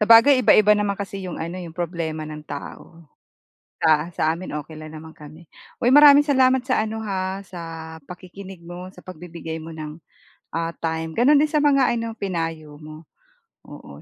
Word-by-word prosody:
Sabagay 230 +5 +7
iba-iba 210 -3 +6
naman 205 -1 0
kasi 195 -1 -6
yung - - -6
ano 170 +3 -5
eh, 175 - -7
yung 160 - -14
problema 165 -3 -3
ng 150 0 -8
tao. 165 +3 -9 0.8
Sa 160 +1 +2
sa - - -3
amin 185 +2 -8
okey 155 +2 -11
lang 155 0 -9
naman 160 +1 -11
kami. 155 +2 -14 0.3
Uy, 245 - +2
maraming 290 0 +8
salamat 260 -2 +4
sa 255 -4 +1
ano 220 0 -4
ha, 190 -1 -3
sa 180 -2 -10 0.4
pakikinig 185 +3 -11
mo, 180 +2 -9
sa - - -16
pagbibigay 165 -2 -8
mo 165 +1 -9
ng, 155 0 -8 0.5
ah, 165 0 -2
time. 160 0 -3
Gano'n 275 - +4
din 300 +1 +3
sa 300 -1 +2
mga 275 -4 +3
ano, 230 -1 -3
pinayo 165 -5 -4
mo, 155 +1 -11 0.6
oo. - - -12
175 Hz, 175 wpm, -22 LUFS, 160-215 Hz, 0.8 s, maraming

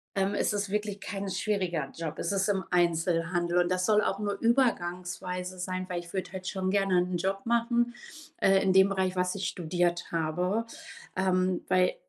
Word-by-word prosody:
ähm, 195 +1 +1
es 210 - +1
ist 205 -1 -1
wirklich 205 0 -2
kein 195 +1 -4
schwieriger 185 -7 -1
Job. 165 -2 -5
Es - - -1
ist 195 +1 +1
im 195 -2 +1
Einzelhandel 175 0 +1
und 175 - -3
das 185 0 +1
soll 210 -1 +4
auch 195 - -1
nur 205 -1 -2
übergangsweise 180 -6 0
sein, 185 0 -3
weil 175 -1 -2
ich 175 0 -14
würde 185 -2 -3
halt 185 -1 -6
schon 190 -1 -1
gerne 195 -3 +3
'nen 180 0 -1
Job 195 +2 -2
machen, 235 +1 +1 0.4
äh, 195 0 +4
in 190 -1 +3
dem 190 +1 +6
Bereich, 190 -1 0
was 180 0 +1
ich 195 - -2
studiert 175 0 -1
habe. 180 +7 0 0.5
Ähm, 185 -1 +1
weil 180 0 +3
185 Hz, 185 wpm, -29 LUFS, 180-200 Hz, 0.5 s, dem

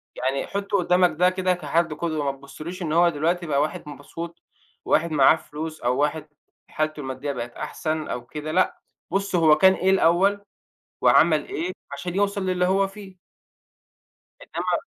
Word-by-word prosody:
"يعني 135 +2 -2
حُط 200 +1 -4
قدّامك 180 -1 +3
ده 180 0 +5
كده 185 0 0
كحد 165 -1 0
قدوة، 155 -2 -2
ما 135 - -13
تبُصّلوش 155 +6 -9
إن 155 -3 -2
هو 170 +1 +5
دلوقتي 170 +3 -1
بقى 145 -3 +1
واحد 150 0 -3
مبسوط، 165 +4 -8 0.4
واحد 165 +1 +2
معاه 145 +1 +6
فلوس، 155 0 -7
أو 125 +2 0
واحد 150 +1 -1 0.4
حالته 155 0 -2
المادية 135 +1 -4
بقت 120 -3 -5
أحسن 155 +4 -3
أو 120 - -5
كده، 150 +4 -6
لأ، 185 - +1 0.3
بُص 195 0 -1
هو 155 -3 +5
كان 190 +4 +6
إيه 190 +1 0
الأول، 195 +2 +3 0.6
وعمل - - +4
إيه 370 -2 -3 0.2
عشان 175 +5 -5
يوصل 200 0 0
للي 180 -1 +1
هو 195 +1 +2
فيه." 195 -2 -12 1.2
إنما - - -2
170 Hz, 160 wpm, -24 LUFS, 150-185 Hz, 1.2 s, معاه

